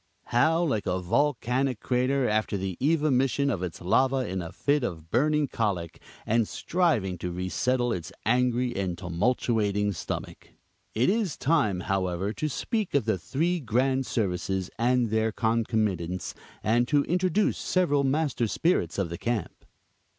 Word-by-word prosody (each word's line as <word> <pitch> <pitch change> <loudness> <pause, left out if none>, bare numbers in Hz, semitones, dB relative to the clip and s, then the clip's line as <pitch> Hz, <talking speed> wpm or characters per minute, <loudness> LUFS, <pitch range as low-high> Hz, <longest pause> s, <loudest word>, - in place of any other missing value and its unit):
How 160 +8 +4
like 110 -11 -1
a 90 0 0
volcanic 125 +4 0
crater 130 +1 +1
after 110 -1 0
the 95 -1 -3
evomition 140 -2 +2
of 90 - -4
its 90 -3 -5
lava 130 +8 +2
in 95 0 -3
a 85 - -7
fit 145 -1 0
of 85 -7 -5
burning 150 +4 +2
cholic, 95 -9 -2 0.3
and 115 0 +2
striving 120 - 0
to 90 - -3
resettle 120 +7 0
its 85 -2 -5
angry 125 0 +1
and 95 -3 -2
tumultuating 105 +2 0
stomach! - - -6 0.4
It 120 +10 +3
is 210 -7 -1
time, 130 - +1
however, 95 0 -1
to 155 +8 -2
speak 210 - -2
of 140 - +2
the 110 -4 0
three 170 - 0
grand 130 +1 0
services 95 -3 -1
and 120 -1 +2
their 110 0 +1
concomitants, 110 -6 -1 0.3
and 120 +3 +2
to 145 0 +3
introduce 185 +5 +1
several 145 -7 +1
master 135 -3 +1
spirits 110 - 0
of 100 -4 -1
the 85 - -5
camp. 115 -6 -3
120 Hz, 145 wpm, -27 LUFS, 95-140 Hz, 0.4 s, How